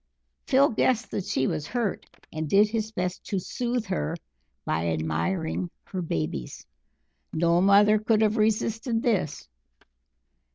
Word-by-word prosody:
Phil 275 +1 +5
guessed 235 0 +1
that 190 - -3
she 195 -10 0
was 150 - -2
hurt, 235 -5 -2 0.3
and 155 -1 -3
did 205 +4 +5
his 220 0 -3
best 180 -3 -3
to 200 - -2
soothe 240 +5 -2
her 185 -3 -2 0.5
by 80 +1 0
admiring 85 - -1
her 185 - -5
babies. 80 - -4 0.7
No 170 +2 +2
mother 205 +2 +5
could 220 0 +2
have 215 +1 +2
resisted 220 +2 0
this. 195 - -1
200 Hz, 130 wpm, -26 LUFS, 165-220 Hz, 0.7 s, Phil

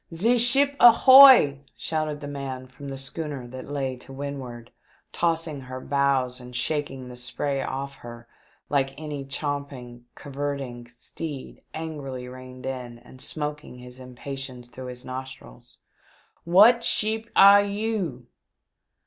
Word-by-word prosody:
" - - -16
Ze 225 +9 +3
sheep 275 +4 +4
ahoy 250 - +8
!" - - -42
shouted 155 -2 -3
the 145 - -6
man 135 -2 -6
from 135 +2 -12
the 135 - -6
schooner 135 -1 -6
that 130 +2 -9
lay 135 -3 -3
to 125 +2 -13
windward, 135 -4 -7 0.4
tossing 165 -4 -1
her 130 0 -8
bows 135 -2 0
and 125 0 -11
shaking 135 -1 -3
the 125 - -10
spray 135 +3 -3
off 140 +1 -4
her 120 0 -11 0.4
like 135 -1 -1
any 150 -3 -5
champing 140 -2 -5
and 120 0 -17
curvetting 140 -4 -5
steed 135 +4 -8
angrily 140 -6 -6
reined 130 0 -11
in 125 -3 -6
and 130 +2 -15
smoking 150 -3 -4
his 125 +1 -12
impatience 130 -1 -8
through 130 +1 -9
his 125 0 -9
nostrils, 130 - -10 0.4
" - - -31 0.3
What 215 +8 +6
sheep 220 +1 0
air 200 +1 +8
you 200 - -3
135 Hz, 140 wpm, -25 LUFS, 125-155 Hz, 0.4 s, ahoy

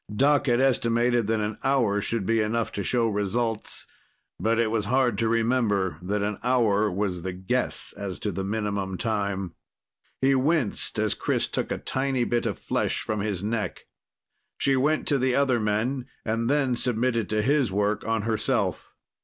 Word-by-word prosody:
Doc 145 +5 +3
had 120 -1 +3
estimated 120 -3 +2
that 110 0 +1
an 105 0 -3
hour 120 -7 +2
should 115 -1 -1
be 115 +1 +2
enough 110 +2 -1
to 100 - -3
show 115 +3 +1
results, 110 +2 -2 0.5
but 115 +1 +1
it 115 -2 +2
was 110 -2 0
hard 125 0 +2
to 115 -1 +2
remember 110 -7 +1
that 100 +3 -1
an 105 -1 -2
hour 110 -4 +2
was 95 -2 -2
the 95 +1 -4
guess 95 +1 -2
as 100 -3 -5
to 105 - -3
the 95 +1 -3
minimum 100 -2 -2
time. 100 -5 -2 0.7
He 135 +1 +3
winced 135 -3 +1
as - - +2
Chris - - 0
took - - -3
a - - 0
tiny 130 -1 -1
bit 120 -1 0
of 100 -7 -3
flesh - - -1
from 110 -1 -2
his 100 -3 -2
neck. 105 -3 -3 0.7
She 135 - +2
went 150 +4 +1
to 140 -2 +2
the 130 0 +1
other 135 -4 +3
men, 115 +5 -1 0.2
and 115 +2 0
then 135 -3 +2
submitted 120 -2 0
to 110 0 +1
his 140 -3 +2
work 105 +2 0
on 115 -2 -1
herself. 110 - -1
115 Hz, 175 wpm, -26 LUFS, 105-125 Hz, 0.7 s, Doc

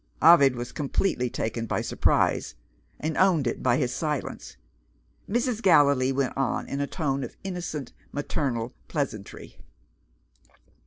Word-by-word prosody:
Ovid 140 -5 +7
was 120 0 -5
completely 140 -3 -1
taken 115 0 -3
by - - -1
surprise, - - +1 0.4
and 155 0 -2
owned 180 -7 +4
it 120 - -2
by 125 -1 +3
his 125 -3 0
silence. 150 - -4 0.7
Mrs. 235 +1 0
Gallilee 140 - +5
went 135 -1 -1
on 135 -2 -1
in 140 - -3
a 140 - -1
tone 140 -5 -2
of - - -8
innocent 175 -6 -5 0.2
maternal 130 -5 -2
pleasantry. 130 - -5
140 Hz, 125 wpm, -26 LUFS, 125-160 Hz, 0.7 s, Ovid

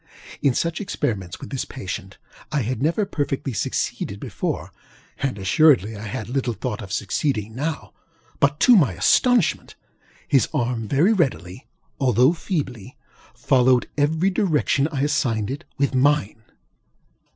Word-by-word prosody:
In 140 -4 +2
such 170 +2 -1
experiments 105 - -3
with - - -9
this 135 - -2
patient, 100 -4 -7 0.3
I 145 -4 0
had 125 +2 -3
never 170 +8 +1
perfectly 140 -6 -3
succeeded 100 - -2
before, - - -4 0.5
and 135 -5 -2
assuredly 110 - +3
I 105 +2 -7
had 105 +1 -5
little 125 -2 -2
thought 115 +2 -4
of 95 -3 -9
succeeding 110 +1 -1
now; 150 +5 -4 0.5
but 145 +1 +2
to 250 - +7
my 170 -10 +4
astonishment, 245 -9 +2 0.5
his 135 -4 +3
arm 120 -2 -1
very 160 - +3
readily, 125 - -2 0.3
although 130 +2 +4
feebly, 145 - -4 0.4
followed 125 -1 +3
every 160 +6 +1
direction 150 -7 +1
I 140 -2 -1
assigned 130 -7 0
it 145 +5 -6
with 140 0 +1
mine. 130 -5 +2
135 Hz, 135 wpm, -22 LUFS, 110-150 Hz, 0.5 s, to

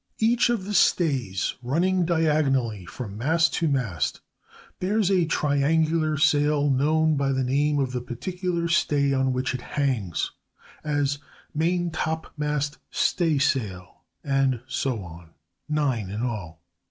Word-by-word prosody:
Each 235 +2 +3
of 225 -6 0
the 210 - -4
stays 135 - +2
running 175 +8 +1
diagonally 140 - +1
from 105 -5 -7
mast 165 +6 +2
to 165 - 0
mast 115 - -1 0.6
bears 200 +1 +1
a 180 -3 +3
triangular 155 +2 +1
sail 145 -1 +3
known 155 +4 +2
by 140 0 +1
the 130 -1 0
name 145 +3 +1
of 135 -3 0
the 125 -1 -3
particular 170 +8 -3
stay 145 -4 +2
on 130 -1 +1
which 130 +1 -1
it 130 - -4
hangs, 120 - -1 0.5
as 145 -2 0 0.4
maintopmast 160 -3 -1
staysail, 130 - 0 0.2
and 135 -3 +1
so 130 -5 -2
on—nine 90 - -4
in 105 +4 -4
all. 95 -10 -5
145 Hz, 120 wpm, -25 LUFS, 125-160 Hz, 0.6 s, Each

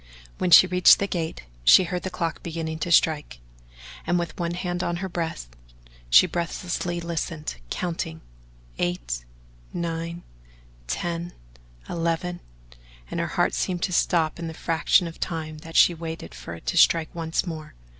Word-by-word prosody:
When 180 - +1
she 170 +2 +10
reached 180 -1 +6
the 200 - -1
gate, 165 - -3 0.2
she 60 - +8
heard 180 0 -3
the 185 - -4
clock 170 -2 -3
beginning 160 -1 -4
to 170 - -2
strike, 150 - +3 0.7
and 175 +1 +2
with 170 -2 -3
one 170 0 -1
hand 175 -1 -2
on 175 - -1
her 190 +2 -3
breast 165 - -4 0.6
she - - +8
breathlessly 175 0 -3
listened, 165 - -4
counting 165 - -3 0.6
"eight, - - -2 0.5
nine, 170 0 -4 0.6
ten, 170 - -3 0.5
eleven" 170 +1 -2 0.7
and - - -2
her - - 0
heart - - +1
seemed 180 -1 -1
to 185 - 0
stop 165 -2 +2
in 170 - -4
the 160 - -7
fraction 165 +3 +2
of 165 -1 -8
time 155 -3 -4
that 165 +1 -11
she 175 - +7
waited 160 - -7
for 65 +7 -8
it 85 - -14
to - - -1
strike 165 -1 +4
once 165 0 -1
more. 160 -3 -7
170 Hz, 155 wpm, -25 LUFS, 160-175 Hz, 0.7 s, she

